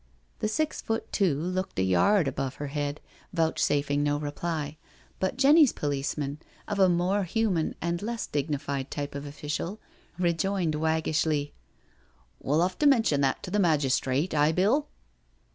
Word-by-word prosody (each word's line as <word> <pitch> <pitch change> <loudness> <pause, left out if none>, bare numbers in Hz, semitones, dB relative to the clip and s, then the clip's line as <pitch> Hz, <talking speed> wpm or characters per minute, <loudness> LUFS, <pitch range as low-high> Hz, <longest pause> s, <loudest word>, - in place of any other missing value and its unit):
The - - 0
six 310 +8 -1
foot 225 +1 -3
two 175 -9 +2
looked 185 +3 -3
a 95 - +2
yard 135 - +3
above 135 0 -3
her 145 - -5
head, 145 0 -3 0.3
vouchsafing 145 -3 +1
no 145 0 +1
reply, 150 0 -3 0.4
but 190 +4 -1
Jenny's 285 +1 +6
policeman, 145 0 -2 0.3
of 205 -1 -2
a 190 -1 +6
more 180 +4 +1
human 185 -3 0
and 170 +1 -1
less 230 +2 -3
dignified 140 -2 -2
type 145 -1 -4
of 140 +1 -6
official, 150 +7 -4 0.4
rejoined 175 -1 0
wag 160 +1 0
gishly: 150 -2 0 0.5
" - - -36
We'll 150 +5 +2
'ave 180 0 -1
to 295 - +4
mention 225 - +3
that 135 -1 0
to - - -6
the 210 - +1
magistrate, 145 -2 +1
aye, 150 +1 +3
Bill?" 215 - +2
155 Hz, 155 wpm, -27 LUFS, 145-190 Hz, 0.5 s, Jenny's